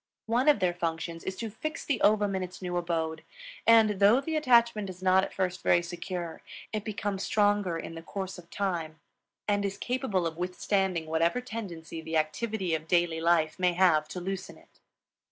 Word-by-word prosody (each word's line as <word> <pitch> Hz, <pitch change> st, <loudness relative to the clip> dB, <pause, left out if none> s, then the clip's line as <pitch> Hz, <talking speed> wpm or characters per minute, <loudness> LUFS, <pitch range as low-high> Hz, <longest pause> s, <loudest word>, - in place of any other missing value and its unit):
One 240 Hz, +5 st, +3 dB
of 295 Hz, -, +6 dB
their 180 Hz, -2 st, +2 dB
functions 165 Hz, -1 st, -3 dB
is 190 Hz, -, -3 dB
to 225 Hz, +1 st, -5 dB
fix 310 Hz, +8 st, -5 dB
the 275 Hz, -6 st, -1 dB
ovum 205 Hz, -1 st, +3 dB
in 190 Hz, -, -1 dB
its 180 Hz, 0 st, -6 dB
new 180 Hz, -1 st, -4 dB
abode; 165 Hz, -2 st, -2 dB, 0.4 s
and, 220 Hz, -3 st, +6 dB
though 205 Hz, +5 st, +6 dB
the 315 Hz, +3 st, -3 dB
attachment 235 Hz, -8 st, +3 dB
is 185 Hz, 0 st, -9 dB
not 190 Hz, 0 st, +5 dB
at -, -, -4 dB
first 185 Hz, -1 st, -2 dB
very 175 Hz, 0 st, +3 dB
secure, 175 Hz, -1 st, -5 dB, 0.3 s
it 215 Hz, -1 st, -2 dB
becomes 205 Hz, -2 st, -3 dB
stronger 205 Hz, -3 st, +2 dB
in 165 Hz, -, -6 dB
the 165 Hz, -, -7 dB
course 190 Hz, +2 st, -5 dB
of 170 Hz, -1 st, -15 dB
time 170 Hz, -6 st, -3 dB, 0.5 s
and 205 Hz, -1 st, +1 dB
is 200 Hz, 0 st, -2 dB
capable 245 Hz, -6 st, -1 dB
of 165 Hz, -1 st, -3 dB
withstanding 180 Hz, -1 st, 0 dB
whatever 165 Hz, +7 st, +1 dB
tendency 185 Hz, -10 st, -7 dB
the 160 Hz, 0 st, -2 dB
activity 185 Hz, +4 st, -1 dB
of 160 Hz, 0 st, -2 dB
daily 170 Hz, -1 st, +2 dB
life 165 Hz, 0 st, +2 dB
may 180 Hz, -1 st, +3 dB
have 170 Hz, -4 st, +4 dB
to 180 Hz, -, -6 dB
loosen 190 Hz, +1 st, -5 dB
it. -, -, -24 dB
185 Hz, 190 wpm, -29 LUFS, 170-210 Hz, 0.5 s, of